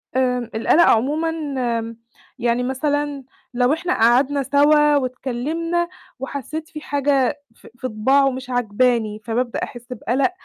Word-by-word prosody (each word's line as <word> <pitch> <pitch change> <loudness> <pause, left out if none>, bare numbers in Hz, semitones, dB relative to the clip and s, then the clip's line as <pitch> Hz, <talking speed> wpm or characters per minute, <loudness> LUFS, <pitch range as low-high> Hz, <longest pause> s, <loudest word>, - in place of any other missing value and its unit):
آآ، 250 -2 0
القلق 265 +9 +4
عمومًا 300 +8 +2 0.5
م 230 0 -7 0.4
يعني 240 +1 +1
مثلًا 285 +1 -1 0.3
لو 250 +3 +2
إحنا 355 +3 -1
قعدنا 260 +5 +3
سَوا 295 +2 +4
واتكلِّمنا 285 +7 -2 0.3
وحسّيت 280 +4 -5
في 305 - -8
حاجة 280 -2 0
في - - -16
في 255 - -4
طباعه 265 +5 +3
مش 255 0 -7
عاجباني، 235 -2 +1
فبابدأ 240 +1 -1
أحس 240 +1 -7
بقلق، 260 +7 0
260 Hz, 125 wpm, -21 LUFS, 245-290 Hz, 0.5 s, القلق